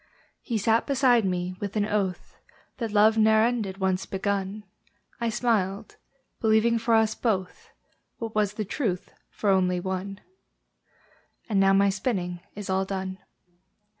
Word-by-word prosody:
He 235 - -2
sat 225 +2 +2
beside 255 -5 +3
me, 180 -1 -2
with 205 0 -5
an 210 -1 +2
oath 200 -4 -2 0.4
That 230 -4 -3
love 215 +1 +4
ne'er 220 0 +5
ended, 225 -5 -1
once 190 -1 -1
begun; 200 +1 -2 0.6
I 235 -1 0
smiled, 215 -3 -1 0.4
believing 225 +1 +3
for 230 0 +2
us 220 -1 +3
both, 225 - -2 0.5
What 225 -1 -5
was 210 -1 +1
the 215 0 -3
truth 195 - -3 0.2
for 205 - 0
only 180 -1 +2
one: 190 +2 -4 1.3
And 210 -5 +1
now 195 0 +5
my 200 +1 +4
spinning 190 -4 -2 0.2
is 205 -1 -6
all 190 0 +1
done. 190 -1 -4
205 Hz, 140 wpm, -26 LUFS, 190-225 Hz, 1.3 s, ne'er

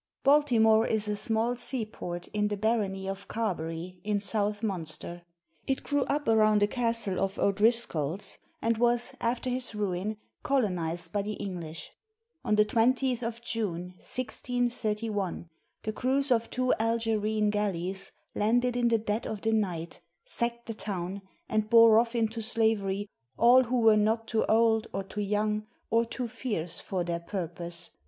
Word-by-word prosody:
[Baltimore 235 -7 +5
is 215 -1 +1
a 210 - 0
small 225 +3 +1
seaport 220 -8 -3
in 210 0 0
the 205 0 -2
barony 200 -3 0
of 195 +1 -5
Carbery, 180 -4 -3
in 210 0 0
South 205 +1 -1
Munster. 175 -3 -4 0.5
It 270 - -1
grew 285 -2 +1
up 290 +1 -1
around 215 -2 +4
a - - +4
castle 230 -4 0
of 195 0 -1
O'Driscoll's, 200 -5 +1 0.2
and 230 0 +1
was, 240 0 +2
after 235 +2 -1
his 250 -3 -2
ruin, 205 +1 -2 0.2
colonized 180 - -1
by 205 - +1
the 210 +2 -3
English. 170 -6 -6 0.5
On 210 - +2
the 210 0 +5
20th 250 +3 +2
of 230 0 -4
June, 180 -7 -3
1631, 225 -7 -2 0.4
the 215 - -2
crews 265 +4 +1
of 230 -1 +2
two 255 0 +1
Algerine 220 -2 +1
galleys 195 -2 -1 0.2
landed 245 +3 +2
in 245 -1 +2
the 230 -1 +4
dead 215 +1 -2
of 215 -2 -5
the 225 0 +1
night, 175 -6 -1 0.3
sacked 235 - -1
the 225 - -4
town, 195 -2 -4 0.3
and 215 0 0
bore 230 -1 +8
off 235 +1 0
into 225 0 0
slavery 215 -3 +1 0.3
all 250 +2 +6
who 245 +1 0
were 220 -1 +6
not 220 +2 +1
too 225 -1 +1
old, 225 0 +3
or 195 - -2
too 210 +2 -5
young, 210 +1 0 0.2
or 230 +1 +3
too 245 +1 -4
fierce, 215 -9 -4
for 185 -3 -2
their 170 0 -2
purpose. 170 -1 -4
215 Hz, 155 wpm, -29 LUFS, 195-235 Hz, 0.5 s, bore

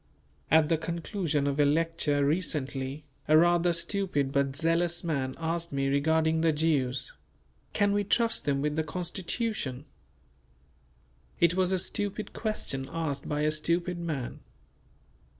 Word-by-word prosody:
At 160 -1 +5
the 165 -1 +1
conclusion 165 -2 -2
of 140 +1 -1
a - - +6
lecture 150 -1 +2
recently, 140 -3 -2 0.2
a 155 - +6
rather 175 +1 +4
stupid 170 -5 0
but 140 -1 0
zealous 170 +3 +1
man 140 -6 -2
asked 165 +1 -2
me 135 -1 0
regarding 160 +3 +2
the 165 -1 +4
Jews. 145 -5 0 0.6
"Can 205 -1 +2
we 205 0 +1
trust 230 +3 +1
them 140 -1 0
with 150 0 0
the 160 - +1
Constitution?" 175 - -3 1.5
It 170 0 +5
was 185 0 +1
a 190 - +2
stupid 205 +3 -3
question 135 - -3
asked 145 -4 -3
by 150 -1 -1
a 155 0 +2
stupid 170 +3 0
man. 155 -7 -4
160 Hz, 135 wpm, -29 LUFS, 145-175 Hz, 1.5 s, a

